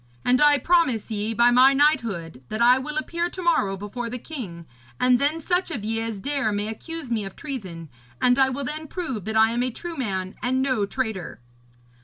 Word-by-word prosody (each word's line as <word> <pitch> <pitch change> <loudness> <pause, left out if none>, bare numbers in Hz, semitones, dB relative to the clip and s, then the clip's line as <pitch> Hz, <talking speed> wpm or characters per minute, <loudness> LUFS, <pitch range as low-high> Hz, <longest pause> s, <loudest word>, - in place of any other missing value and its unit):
And 250 +2 +3
I 295 -1 +6
promise 260 - +1
ye, 215 +1 -2
by 235 +1 +5
my 260 +3 +6
knighthood, 220 - +1
that 215 - -3
I 245 +2 +6
will 300 +3 -4
appear 340 +3 -1
to 370 - -7
morrow 205 - +2
before 220 +4 -5
the 250 - -4
king, 220 - -8 0.3
and 250 -1 +4
then 295 +4 +1
such 355 +3 0
of 215 -4 -4
ye 225 +1 -1
as 225 -2 -3
dare 275 +1 -1
may 205 +1 -2
accuse 310 +4 -7
me 220 -3 0
of 195 -1 -8
treason, 190 - -7 0.3
and 250 +1 +3
I 265 0 +5
will 275 +2 -3
then 305 +4 -4
prove 265 - -4
that 220 0 -1
I 220 0 +5
am 240 +1 0
a 255 - +1
true 340 +7 -6
man 190 -8 -3
and 255 +1 0
no 255 -7 +1
traitor.' 215 - -4
245 Hz, 210 wpm, -24 LUFS, 215-285 Hz, 0.3 s, I